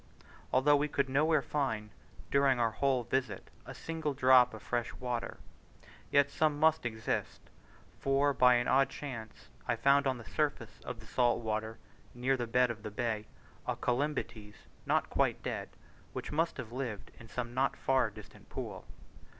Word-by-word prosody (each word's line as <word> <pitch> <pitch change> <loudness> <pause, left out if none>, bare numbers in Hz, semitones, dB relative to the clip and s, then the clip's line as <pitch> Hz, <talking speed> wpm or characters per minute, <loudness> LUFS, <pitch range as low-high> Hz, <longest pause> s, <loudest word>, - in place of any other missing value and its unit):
Although 145 +3 +5
we 145 +1 +1
could 140 -2 0
nowhere 150 +2 +3
find, 110 -9 -2 0.4
during 140 -2 +4
our 115 -1 +2
whole 130 +1 +1
visit, 130 +2 -2 0.2
a - - -8
single 160 -3 -3
drop 130 -2 +6
of 110 - -11
fresh 120 -1 -1
water, 125 -2 -3 0.7
yet 140 0 +4
some 150 -1 +1
must 160 -4 +3
exist; 110 -1 -3 0.6
for 140 +1 +2
by 125 -1 +6
an 120 0 +1
odd 135 +1 +4
chance 120 -7 -8 0.2
I - - +2
found 140 +4 +4
on 130 -1 0
the 120 - -11
surface 145 -7 -2
of 120 -3 -6
the - - -13
salt 120 +1 +2
water, 110 0 -2 0.4
near 130 +2 +1
the 120 -3 -3
head 125 0 +4
of 110 -2 -8
the 105 - -5
bay, 110 0 -2 0.4
a - - 0
Colymbetes 120 -5 -2 0.3
not - - +1
quite - - +1
dead, - - -3 0.4
which - - -5
must 165 +3 0
have 120 -4 -6
lived 120 -5 -5
in 115 - -12
some 120 +1 -4
not 135 +2 +1
far 130 -4 +2
distant 100 - -14
pool. - - -6
125 Hz, 165 wpm, -32 LUFS, 115-140 Hz, 0.7 s, drop